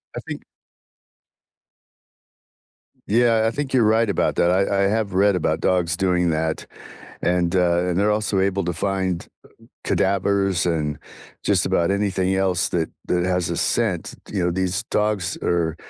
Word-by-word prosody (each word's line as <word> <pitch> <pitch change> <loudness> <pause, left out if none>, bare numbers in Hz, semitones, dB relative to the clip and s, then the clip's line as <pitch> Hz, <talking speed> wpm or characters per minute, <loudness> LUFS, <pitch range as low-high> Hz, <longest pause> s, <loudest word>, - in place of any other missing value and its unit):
I - - -3
think - - -8 2.6
Yeah, 115 +1 +3
and 110 - +2
I - - +1
think 140 +1 -4
you're 125 -3 +4
right 110 +1 +3
about 100 - 0
that, 85 - +3
I 100 +1 +1
I 100 - +3
have 105 -1 -1
read 100 +1 +3
about 90 - 0
dogs 85 -2 +1
doing 90 -2 +1
that, 80 0 -1 0.6
and, 90 0 +1
uh 90 -1 +2
and 90 0 0
they're 105 +2 +2
also 105 -2 0
able 95 0 0
to 85 - -1
find 95 0 -2 0.6
cadavers 95 -1 +1
and 75 -4 -1 0.4
just - - +1
about 85 +1 +1
anything 95 -2 0
else 95 -2 +1
that 80 -2 -1 0.2
that 90 0 0
has 90 -2 0
a 85 - -2
scent, 105 -8 -1 0.2
you 95 -4 0
know, 90 - +1
these 95 +4 -1
dogs 105 -3 0
are 85 -2 0
95 Hz, 160 wpm, -22 LUFS, 85-100 Hz, 2.6 s, you're